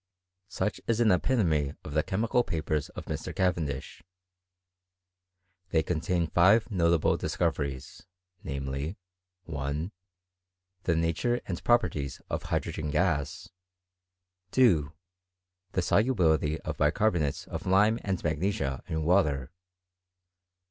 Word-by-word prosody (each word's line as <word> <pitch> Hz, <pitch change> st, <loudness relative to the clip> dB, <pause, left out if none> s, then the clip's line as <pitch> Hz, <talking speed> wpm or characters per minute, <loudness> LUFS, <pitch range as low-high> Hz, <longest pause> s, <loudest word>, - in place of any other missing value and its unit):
Such 105 Hz, +1 st, -2 dB
is 115 Hz, -1 st, +1 dB
an 115 Hz, -3 st, +5 dB
epitome 85 Hz, -, +1 dB
of -, -, -7 dB
the 75 Hz, -, +3 dB
chemical 115 Hz, +8 st, +1 dB
papers 80 Hz, -4 st, -2 dB
of -, -, -8 dB
Mr. -, -, -5 dB
Cavendish. 80 Hz, -8 st, -1 dB, 1.7 s
They 80 Hz, -2 st, +2 dB
contain 85 Hz, +2 st, 0 dB
five 95 Hz, +9 st, +4 dB
notable 85 Hz, -4 st, +3 dB
discoveries 70 Hz, +3 st, -2 dB, 0.4 s
j -, -, -8 dB
namely, 70 Hz, +5 st, -3 dB, 0.5 s
1. 75 Hz, +2 st, -3 dB, 0.9 s
The 85 Hz, -, +2 dB
nature 85 Hz, +10 st, +1 dB
and 85 Hz, -3 st, -5 dB
properties 110 Hz, -, +1 dB
of -, -, -1 dB
hydrogen 75 Hz, -1 st, -2 dB
gas. 80 Hz, 0 st, 0 dB, 1.0 s
2. 85 Hz, -, +4 dB, 0.8 s
The 90 Hz, -, +1 dB
solubility 80 Hz, -, +2 dB
of -, -, -5 dB
bicarbonates 75 Hz, -1 st, +1 dB
of -, -, -6 dB
lime 105 Hz, +5 st, +4 dB
and 95 Hz, -3 st, -2 dB
magnesia 80 Hz, -4 st, -1 dB
in 80 Hz, -1 st, -2 dB
water. 75 Hz, -7 st, +2 dB
85 Hz, 105 wpm, -29 LUFS, 75-100 Hz, 1.7 s, an